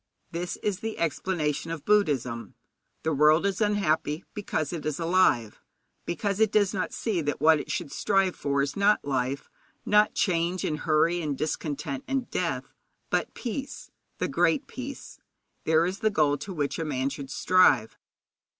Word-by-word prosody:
This 175 +1 -3
is 205 -3 -1
the 220 +1 -4
explanation 165 -2 -1
of 165 -3 -5
Buddhism. 130 - +1 0.5
The 160 - 0
world 150 +5 +4
is 200 +1 -1
unhappy 175 -6 +1
because 175 -7 -2
it 165 - -4
is 155 0 -2
alive, 165 - +2 0.5
because 200 +3 -1
it 220 -2 +4
does 205 -2 +3
not 190 - -2
see 205 -7 -1
that 145 -2 -2
what 155 +1 +5
it - - -7
should 165 -6 -3
strive 195 -2 +1
for 140 0 0
is 140 0 -3
not 200 -2 +3
life, 135 0 -1 0.4
not 210 0 +4
change 175 0 0
and 150 -1 -2
hurry 165 +3 +2
and 145 -4 -2
discontent 145 -3 -3
and 270 -2 -2
death, - - -2 0.4
but - - 0
peace 265 +3 -5 0.3
the - - -1
Great 290 - +2
Peace. 270 +2 -8 0.5
There 160 +1 +4
is 185 +2 -3
the 220 -1 +2
goal 150 -7 +2
to 150 +8 -7
which 150 -4 -2
a - - -1
man 135 -3 -1
should 140 -1 -7
strive. 140 -8 +3
165 Hz, 165 wpm, -27 LUFS, 145-200 Hz, 0.5 s, what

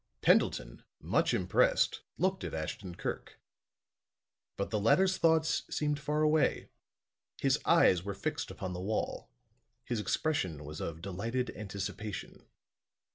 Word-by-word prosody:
Pendleton, - - +2 0.2
much - - +1
impressed, - - +2 0.2
looked 185 +2 0
at - - -4
Ashton 85 +3 -5
Kirk. - - -5 1.2
But 100 - -2
the 105 - +1
latter's 185 - +4
thoughts 160 -1 +3
seemed 150 -1 -1
far 150 +1 0
away; 155 -1 +2 0.7
his - - +2
eyes 90 -2 +5
were 100 +2 -5
fixed 145 +7 -3
upon 95 -1 -5
the 90 - -5
wall; 105 +4 -2 0.6
his 120 -3 -2
expression 95 - -1
was 75 +1 -7
of 80 0 -5
delighted 115 +7 -2
anticipation. 105 0 -6
105 Hz, 125 wpm, -32 LUFS, 90-150 Hz, 1.2 s, eyes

